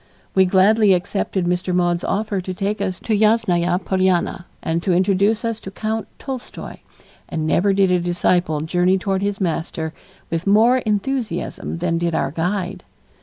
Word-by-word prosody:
We 190 0 +5
gladly 195 +2 +4
accepted 185 0 -2
Mr. 180 +1 0
Maude's 175 -1 +1
offer 205 -1 -1
to 185 +1 -5
take 200 +2 -2
us 185 -2 -2
to 220 - 0
Yasnaya 200 -5 +2
Polyana 185 -1 +1 0.2
and 165 +1 -1
to 185 - 0
introduce 200 +5 +2
us 230 -1 -2
to 195 - -8
Count 220 +3 -3
Tolstoy, 265 -3 -7 0.5
and 160 -2 -2
never 185 +5 +2
did 195 -1 +3
a 180 - +3
disciple 175 -2 +1
journey 180 +4 +2
toward 190 0 -1
his 200 0 -2
master 165 -3 -2 0.4
with 165 +3 -2
more 225 +5 +5
enthusiasm 210 -5 -2
than 165 -1 0
did 170 -1 -1
our 135 - 0
guide. 180 +3 -2
185 Hz, 160 wpm, -20 LUFS, 175-205 Hz, 0.5 s, We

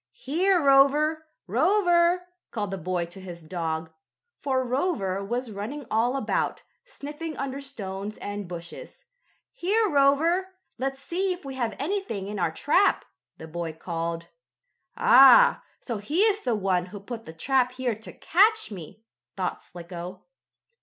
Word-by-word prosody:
"Here, 370 - +1
Rover! 295 +2 +4 0.2
Rover!" 350 - +3 0.3
called 205 -4 -3
the 195 - -3
boy 180 0 -1
to 175 +3 -11
his 175 -2 -8
dog, 160 -1 -4 0.5
for 260 -2 0
Rover 240 - -1
was 240 +3 -3
running 230 +8 -6
all 240 +4 +2
about, 270 - -1 0.2
sniffing 310 - -7
under 275 0 -4
stones 205 -6 -6
and 205 -1 -5
bushes. 175 - -9 0.5
"Here, 435 0 +1
Rover! 330 +5 +2 0.2
Let's 270 +1 -3
see 370 +2 -1
if 355 -4 -12
we 270 - -5
have 240 -4 -2
anything 310 - -3
in 205 0 -5
our 170 -2 +1
trap," 355 - +2 0.3
the 160 - -9
boy 165 0 -4
called. 165 0 -4 0.7
"Ah! 380 - +7 0.2
so 235 -4 -4
he 295 - 0
is 425 -1 +3
the 245 - 0
one 185 -3 0
who 205 +2 -9
put 225 +3 -8
the - - -8
trap 250 +8 +1
here 255 -2 -1
to 220 +1 -10
catch 435 - +3
me!" 190 +3 -10 0.3
thought 185 -2 -2
Slicko. 175 +1 -9
250 Hz, 145 wpm, -26 LUFS, 190-320 Hz, 0.7 s, Ah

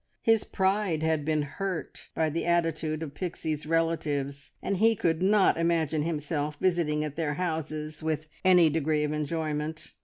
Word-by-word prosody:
His 225 -2 +4
pride 190 -4 0
had 160 -2 +1
been 155 0 +1
hurt 185 +4 -5
by 160 -1 +1
the 165 - -2
attitude 165 -2 0
of 145 -3 -7
Pixie's 155 -3 -4
relatives, 150 -4 -1
and 200 - -1
he 225 +3 +4
could 165 -4 0
not 195 -2 +4
imagine 160 -3 +1
himself 150 -1 -2
visiting 165 -5 +1
at 150 -1 -5
their 150 -3 -1
houses 155 -2 -3
with 155 -1 -2 0.2
any 180 -3 +6
degree 155 0 +1
of 150 0 -1
enjoyment. 155 0 -3
160 Hz, 155 wpm, -28 LUFS, 150-170 Hz, 0.2 s, any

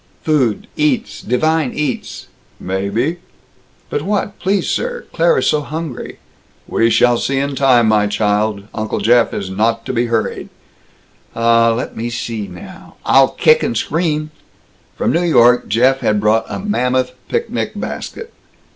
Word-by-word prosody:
"Food. 135 -9 +1
Eats. 260 -6 0
Divine 155 +4 0
eats." 150 -4 -3 0.3
"Maybe." 100 - -2 0.7
"But - - -1
what? 205 +3 -2
Please, 195 +1 0
sir. 485 0 -2
Claire - - +3
is - - +1
so 150 - +2
hungry." 155 -2 -6 0.5
"We 115 - +2
shall 120 0 +3
see 135 - -1
in 140 +1 -1
time, 125 -4 +4
my 105 -1 +3
child. 105 0 0
Uncle 110 0 -3
Jeff 115 +3 +3
is 95 -2 -4
not 115 +3 0
to - - -3
be 120 0 0
hurried." 115 -1 -2 0.9
"Ah 115 0 +4
let - - -5
me 115 +1 -3
see 115 -3 -4
now! 195 -2 -12
I'll - - +5
kick 470 +1 +3
and - - -1
scream!" 155 -2 -1 0.7
From - - +1
New 170 - +1
York 125 -8 +4
Jeff 125 +5 +3
had 105 -4 +1
brought 110 +2 +2
a - - -4
mammoth 130 -11 0 0.2
picnic 465 0 -2
basket. 460 0 -6
125 Hz, 145 wpm, -17 LUFS, 115-160 Hz, 0.9 s, I'll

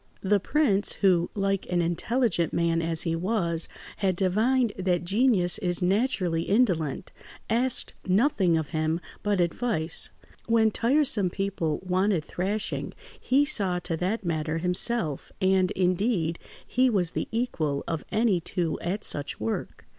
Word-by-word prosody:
The 200 +1 +3
prince, 205 -3 +2
who, 180 -3 +2
like 195 -1 -1
an 175 - +1
intelligent 175 +2 0
man 170 0 +1
as 165 -1 0
he 165 -1 -1
was, 170 -3 0 0.3
had 190 -2 0
divined 220 +6 +1
that 180 -2 0
genius 200 -1 +2
is 175 -4 +1
naturally 185 -4 +1
indolent, 180 - 0 0.4
asked 245 +2 +2
nothing 190 - +2
of 160 -3 -3
him 155 0 -1 0.2
but 205 -2 0
advice; 170 -2 0 0.4
when 225 -1 +3
tiresome 235 -5 +2
people 190 -4 -2
wanted 185 -2 +1
thrashing, 200 +4 -3 0.2
he 275 +4 +2
saw 195 -11 +1
to 175 -2 -3
that 195 +5 -2
matter 160 -1 -1
himself, 180 - 0
and, 190 -1 +2
indeed, 180 -2 0 0.3
he 255 +1 +2
was 185 -7 0
the - - -3
equal 165 - -1
of 165 -2 -3
any 215 -4 +2
two 170 -1 -2
at 195 +5 -3
such 145 -1 0
work. 110 +1 -4
185 Hz, 140 wpm, -26 LUFS, 170-220 Hz, 0.4 s, The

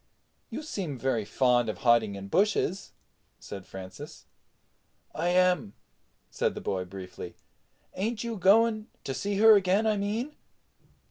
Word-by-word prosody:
"You - - -6
seem 185 - -4
very 120 -4 -1
fond 120 +1 +2
of 110 - -4
hiding 115 -4 +3
in 100 0 -7
bushes," 195 - +1 0.5
said 95 -2 -9
Francis. 95 -1 -10 0.9
"I - - -2
am," 180 - +2 0.6
said - - -1
the - - -4
boy 95 -1 -2
briefly. 90 -1 -9 0.6
"Ain't 215 +4 -2
you 235 -1 -3
going—to 215 -5 +2
see 200 +6 -2
her 220 +1 +8
again, 195 +2 +2
I 215 -1 +2
mean?" 220 +9 -2
180 Hz, 130 wpm, -28 LUFS, -, 0.9 s, her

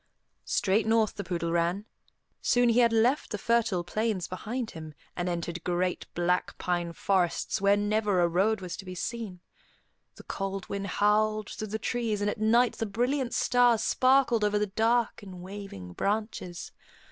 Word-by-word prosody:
Straight 205 +2 +1
north 225 -1 +3
the 200 - -5
poodle 170 -3 -2
ran. 170 +4 0 0.6
Soon 245 -1 +3
he 235 +1 +4
had 235 -1 +5
left 235 +6 +2
the 210 - -3
fertile 225 -5 +1
plains 210 0 -1
behind 225 +6 -4
him, 155 -2 -9 0.2
and 180 0 -2
entered 170 0 -4
great, 180 0 -1
black 175 +1 0
pine 175 -1 -1
forests 180 +1 0
where 200 +1 +4
never 205 -2 +1
a 175 - +4
road 195 +5 +1
was 180 -2 -5
to - - -8
be 185 0 -7
seen. 205 -2 -5 0.7
The - - -13
cold 195 -1 -4
wind 200 0 -4
howled 215 +2 +1
through 215 - -5
the 215 +2 -3
trees, 225 -2 -1
and 205 0 0
at - - -7
night 235 +3 +3
the 225 - -1
brilliant 245 +5 -1
stars 245 -3 +3
sparkled 255 -3 +3
over 210 0 +2
the 210 - +1
dark 225 +4 +1
and 190 -3 -10
waving 185 - -8
branches. 205 - -3
205 Hz, 170 wpm, -28 LUFS, 180-225 Hz, 0.7 s, had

